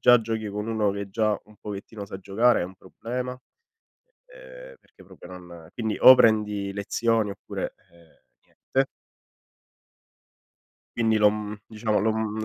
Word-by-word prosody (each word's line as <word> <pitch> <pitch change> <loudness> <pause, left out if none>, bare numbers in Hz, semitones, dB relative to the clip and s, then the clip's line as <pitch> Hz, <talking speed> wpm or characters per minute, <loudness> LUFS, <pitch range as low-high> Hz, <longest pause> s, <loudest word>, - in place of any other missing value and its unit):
già 120 -1 +6
giochi 110 -1 -3
con 105 +1 -4
uno 110 -2 +1
che 100 0 -5
già 110 0 +1
un 105 0 -20
pochettino 105 +1 -8
sa 95 - -8
giocare, 105 +6 +2
è - - -1
un 95 +2 -9
problema, 125 +6 -5 0.8
uhm, - - -14
perché - - -21
proprio - - -14
non 85 -3 -11
quindi 110 -3 -2
o 130 - +10
prendi 105 -4 +2
lezioni, 110 +2 0
oppure, 100 -1 -6 0.2
uhm, 85 -1 -23 0.3
niente. 135 +1 -2 2.1
Quindi 115 -2 +2
l'ho 105 -1 +6
mhm, 105 0 -6
diciamo 110 -1 -1
l'ho 110 +2 +2
mhmm, 110 0 -2
110 Hz, 145 wpm, -25 LUFS, 100-115 Hz, 2.1 s, o